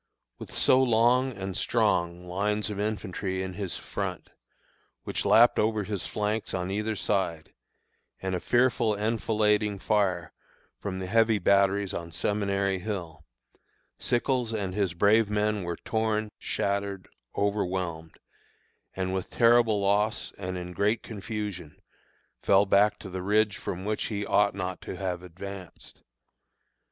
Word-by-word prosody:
With - - -8
so 130 - +5
long 125 +2 +3
and 95 -1 -4
strong 90 -6 +1
lines 105 +4 -1
of 100 - -5
infantry 95 -3 -2
in 95 -1 -5
his 95 -2 -4
front, - - -5 0.7
which - - -3
lapped 120 +1 +6
over 110 -1 +1
his 100 -3 -4
flanks 105 0 -2
on 90 0 -2
either 105 +2 -1
side, 95 -6 -1 0.7
and 95 0 -3
a 90 - 0
fearful 120 -1 +2
enfilading 105 -1 +1
fire 95 -5 0 0.5
from 95 -2 -4
the 95 - -4
heavy 110 +2 +3
batteries 100 +1 +2
on 85 0 -5
Seminary 100 +2 0
Hill, 85 -6 -5 0.8
Sickles 120 -1 0
and 95 -4 -2
his 95 -4 0
brave 105 +4 +4
men 105 0 0
were 85 -1 -4
torn, 110 -1 -1
shattered, 100 -1 -2 0.3
overwhelmed, 90 -5 -2 0.8
and 95 0 -2
with 95 -1 -3
terrible 115 -3 +4
loss 105 +2 +1
and 95 -2 -5
in 90 0 -6
great 105 +5 +1
confusion, 105 -6 -6 0.6
fell 100 +1 +4
back 100 +1 +4
to 95 - -9
the 95 0 -4
ridge 105 +2 +2
from 95 +1 -5
which 105 0 -1
he 105 -2 -3
ought 100 -1 +3
not 95 -1 -4
to - - -6
have 90 -2 -3
advanced. 95 +1 -10
100 Hz, 135 wpm, -28 LUFS, 95-105 Hz, 0.8 s, lapped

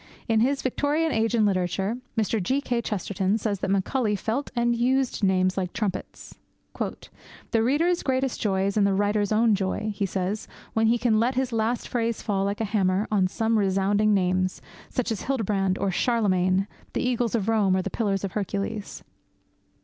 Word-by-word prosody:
In 225 -2 +3
his 270 +4 +1
Victorian 295 +5 0
Age 225 0 +1
in 220 -2 +3
Literature, 195 +3 0 0.2
Mr. 220 0 +1
G. 260 +10 +1
K. 245 -4 -1
Chesterton 200 -1 -1
says 205 -3 -2
that - - -2
Macaulay 210 +3 +1
felt 230 +7 -2
and 240 0 +2
used 255 0 +1
names 185 -1 +2
like 180 -2 -2
trumpets. 210 -4 -5 0.4
'The 225 - -5
reader's 330 +8 +2
greatest 260 -1 -1
joy 190 -2 +1
is 200 +1 -1
in 210 - +4
the 200 -1 +2
writer's 205 +1 +1
own 220 +1 +4
joy,' 205 +2 -1
he 200 0 -1
says, 190 +3 -3 0.3
'when 225 0 +2
he 235 +2 +3
can 225 -3 +2
let 245 +3 +1
his 260 -1 -1
last 225 +2 0
phrase 230 -2 -1
fall 195 -2 0
like 200 +1 -2
a - - +1
hammer 195 -1 +1
on 195 -3 +3
some 225 +3 0
resounding 200 +2 +2
names, 185 -1 +1 0.3
such 250 -1 -2
as 215 - -2
Hildebrand 200 -7 0
or 195 0 0
Charlemagne, 190 -4 +2 0.3
the - - 0
eagles 240 -2 0
of 210 -3 -1
Rome 205 -4 +3
or 185 - 0
the - - -4
pillars 200 -4 -1
of 195 - -2
Hercules. 200 +1 -4
215 Hz, 180 wpm, -25 LUFS, 195-235 Hz, 0.4 s, in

